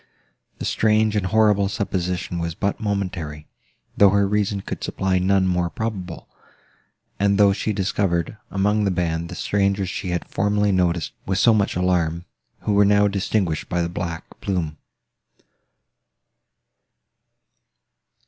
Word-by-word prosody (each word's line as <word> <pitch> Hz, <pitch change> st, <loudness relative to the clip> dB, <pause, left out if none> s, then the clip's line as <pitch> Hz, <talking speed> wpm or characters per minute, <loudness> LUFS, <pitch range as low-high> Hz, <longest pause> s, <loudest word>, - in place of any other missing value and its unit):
The -, -, -5 dB
strange 110 Hz, 0 st, +2 dB
and 100 Hz, -3 st, 0 dB
horrible 105 Hz, -1 st, +3 dB
supposition 90 Hz, -3 st, -2 dB
was 85 Hz, -1 st, -3 dB
but 100 Hz, +1 st, -1 dB
momentary, 90 Hz, -8 st, -3 dB, 0.5 s
though 100 Hz, -, +6 dB
her 100 Hz, 0 st, +2 dB
reason 100 Hz, -1 st, 0 dB
could -, -, -6 dB
supply 95 Hz, -1 st, 0 dB
none 95 Hz, +1 st, +2 dB
more 90 Hz, -1 st, +1 dB
probable, 95 Hz, -5 st, -5 dB, 0.9 s
and 100 Hz, 0 st, +2 dB
though 100 Hz, -1 st, +5 dB
she 110 Hz, -, -2 dB
discovered, 95 Hz, -3 st, -1 dB
among 105 Hz, +2 st, +1 dB
the 100 Hz, -, +2 dB
band, 85 Hz, -2 st, -1 dB
the -, -, -7 dB
strangers 100 Hz, -2 st, 0 dB
she 95 Hz, 0 st, -4 dB
had 90 Hz, -1 st, -2 dB
formerly 105 Hz, +1 st, +1 dB
noticed 90 Hz, -3 st, +1 dB, 0.2 s
with 95 Hz, -1 st, 0 dB
so 115 Hz, +3 st, +5 dB
much 105 Hz, -2 st, +1 dB
alarm, 85 Hz, -2 st, 0 dB, 0.4 s
who 105 Hz, -, 0 dB
were 100 Hz, 0 st, +5 dB
now 105 Hz, 0 st, +4 dB
distinguished 95 Hz, -4 st, -1 dB
by 90 Hz, -1 st, 0 dB
the 85 Hz, -, -2 dB
black 85 Hz, -1 st, -4 dB, 0.2 s
plume. 80 Hz, -6 st, -2 dB
95 Hz, 135 wpm, -22 LUFS, 90-105 Hz, 0.9 s, though